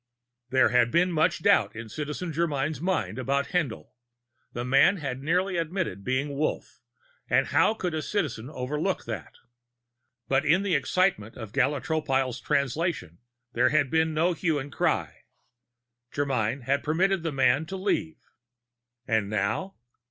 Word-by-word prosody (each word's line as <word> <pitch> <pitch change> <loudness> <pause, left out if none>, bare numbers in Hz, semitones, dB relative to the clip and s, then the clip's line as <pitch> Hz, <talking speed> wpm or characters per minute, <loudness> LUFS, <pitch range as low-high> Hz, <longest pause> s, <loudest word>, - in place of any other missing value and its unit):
There 130 -1 +4 0.2
was 175 +2 +4
much 165 +1 +1
doubt 200 - +3
in 115 0 -7
Citizen 150 +7 -5
Germyn's 150 -2 -1
mind 185 -6 -1
about 140 +2 0
Haendl. 150 -11 -2 0.6
The 120 +1 -4
man 135 +9 +4
had 135 -5 -4
nearly 180 +5 0
admitted 165 - -2
to - - -16
being 140 +5 -1
Wolf, 155 +2 -3 0.5
and - - +3
how 220 - +3
could 180 -6 -3
a 155 - -1
citizen 145 - -2
overlook 150 +6 -2
that? 110 -8 -6 0.9
But 135 0 +2
in 170 +6 +3
the 200 -3 0
excitement 140 - +1
of 110 -3 -8
Gala 140 +1 +1
Tropile's 135 -5 -1
Translation, 140 - -1 0.3
there 120 - +3
had 145 -3 +2
been 160 0 +2
no 170 +3 +2
hue 165 -2 0
and 140 0 -6
cry. - - 0 0.9
Germyn 130 -3 -1
had 140 +3 0
permitted 185 +4 +1
the 165 -1 -2
man 135 +2 +2
to 190 +2 -5
leave. 160 -5 -1 0.9
And 110 -3 +1
now? 110 - -1
145 Hz, 145 wpm, -27 LUFS, 130-170 Hz, 0.9 s, There